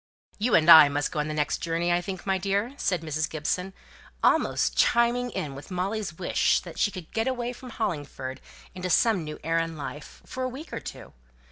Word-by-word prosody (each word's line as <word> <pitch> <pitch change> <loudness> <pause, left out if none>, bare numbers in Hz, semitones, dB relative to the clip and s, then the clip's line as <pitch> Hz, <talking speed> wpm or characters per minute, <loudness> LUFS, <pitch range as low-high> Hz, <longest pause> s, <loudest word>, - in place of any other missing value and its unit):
"You 230 +3 +2
and 155 -1 +4
I 160 -3 +10
must 145 +1 -1
go - - -3
on 150 - -1
the 155 - -3
next 150 -1 0
journey, 170 +1 -1
I 175 - +2
think, 185 0 -6
my 190 -1 +1
dear," 200 +6 -1
said 185 - -1
Mrs. 155 0 -2
Gibson, 180 +5 -2 0.5
almost - - +2
chiming 240 +1 +3
in 150 - -4
with 140 +1 -10
Molly's 190 -1 -3
wish 180 - +2
that - - -10
she - - +3
could 185 -5 -10
get 225 +2 0
away 245 -1 -2
from 255 +1 -11
Hollingford 145 - -4 0.3
into 185 0 -4
some 195 0 +3
new 150 0 -6
air 165 +1 +1
and 165 -1 -3
life, 145 +1 -8
for 260 - -6
a 255 - -1
week 270 +6 -9
or - - -3
two. - - -10
180 Hz, 210 wpm, -26 LUFS, 155-220 Hz, 0.5 s, I